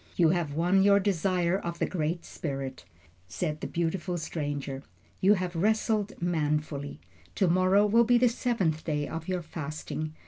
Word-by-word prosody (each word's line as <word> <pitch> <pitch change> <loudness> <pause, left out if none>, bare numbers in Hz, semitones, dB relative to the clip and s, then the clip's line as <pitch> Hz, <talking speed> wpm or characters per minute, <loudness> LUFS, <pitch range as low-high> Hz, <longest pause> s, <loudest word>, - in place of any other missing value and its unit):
"You 170 -3 +4
have 165 -4 0
won 180 +4 +3
your 200 0 +5
desire 185 -1 +1
of 170 -2 -5
the - - +1
Great 170 -1 -2
Spirit," 135 -3 -5 0.4
said 150 +9 -3
the - - -3
beautiful 175 +1 -2
stranger. 145 -4 -4 0.4
"You 200 +3 +5
have 180 -2 -3
wrestled 215 +2 0
manfully. 150 - -1 0.4
To 190 - +2
morrow 185 +4 +4
will 230 +3 +5
be 240 +1 +4
the 245 +1 +4
seventh 215 - 0
day 150 -2 -1
of 160 0 -6
your 180 -2 -2
fasting. 155 0 -5
170 Hz, 160 wpm, -28 LUFS, 155-195 Hz, 0.4 s, your